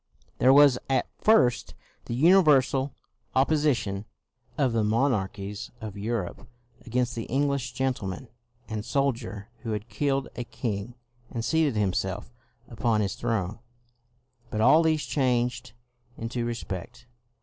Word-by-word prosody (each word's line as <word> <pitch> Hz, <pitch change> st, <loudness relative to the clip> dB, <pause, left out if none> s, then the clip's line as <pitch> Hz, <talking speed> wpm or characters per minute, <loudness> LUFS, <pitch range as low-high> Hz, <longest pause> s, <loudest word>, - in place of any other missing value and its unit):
There 130 Hz, -, +6 dB
was 140 Hz, -2 st, +7 dB
at 135 Hz, -, +2 dB
first 125 Hz, -, +3 dB, 0.3 s
the 120 Hz, -, -3 dB
universal 145 Hz, -4 st, +4 dB, 0.4 s
opposition 130 Hz, -8 st, +1 dB, 0.5 s
of 135 Hz, -5 st, +2 dB
the 115 Hz, -1 st, +2 dB
monarchies 105 Hz, -4 st, -1 dB
of 110 Hz, -4 st, -7 dB
Europe 105 Hz, -2 st, -4 dB, 0.4 s
against 120 Hz, +1 st, -1 dB
the 115 Hz, -, -5 dB
Eng 140 Hz, +4 st, +2 dB
lish 140 Hz, -2 st, -2 dB
gentleman 130 Hz, -4 st, -2 dB, 0.4 s
and 110 Hz, -2 st, -4 dB
soldier 120 Hz, -6 st, -2 dB
who 110 Hz, -1 st, -4 dB
had 105 Hz, +2 st, -5 dB
killed 135 Hz, +4 st, 0 dB
a 120 Hz, -, -3 dB
king, 115 Hz, -1 st, -4 dB, 0.3 s
and 115 Hz, -1 st, -4 dB
seated 160 Hz, -5 st, +2 dB
himself 100 Hz, +2 st, -1 dB, 0.3 s
upon 115 Hz, -2 st, 0 dB
his 100 Hz, -2 st, -1 dB
throne, 115 Hz, -3 st, -2 dB, 0.9 s
but 110 Hz, -, -3 dB
all 135 Hz, +8 st, +6 dB
this 160 Hz, -2 st, +1 dB
changed 125 Hz, -4 st, 0 dB, 0.4 s
into 115 Hz, +1 st, -3 dB
respect. 120 Hz, 0 st, -6 dB
120 Hz, 125 wpm, -27 LUFS, 105-135 Hz, 0.9 s, was